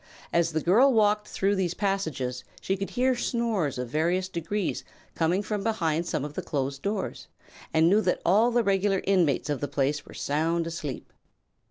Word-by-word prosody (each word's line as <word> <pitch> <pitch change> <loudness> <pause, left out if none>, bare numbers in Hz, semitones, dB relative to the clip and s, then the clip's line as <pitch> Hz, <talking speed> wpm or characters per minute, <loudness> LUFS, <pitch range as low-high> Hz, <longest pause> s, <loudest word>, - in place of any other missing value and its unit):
As 170 -1 +2
the 160 - 0
girl 230 - +5
walked 210 -2 +2
through 200 +1 0
these 180 -3 -1
passages 160 -11 -2 0.2
she 195 - -1
could 195 0 -4
hear 255 +1 +1
snores 230 - -1
of 125 -1 -4
various 175 +6 0
degrees 185 +2 -3 0.3
coming 175 +5 +1
from 205 0 -2
behind 170 -7 0
some 145 - -2
of 150 - -7
the - - -3
closed 135 -1 -3
doors 200 0 -3 0.4
and 160 +1 +4
knew 205 +5 +4
that 180 - 0
all 210 +7 +4
the 240 -1 +2
regular 195 -1 +1
inmates 175 -9 +2
of 145 -3 -2
the 145 - -1
place 145 +2 -1
were - - -14
sound 165 +3 0
asleep. 160 -5 -6
180 Hz, 180 wpm, -27 LUFS, 155-205 Hz, 0.4 s, girl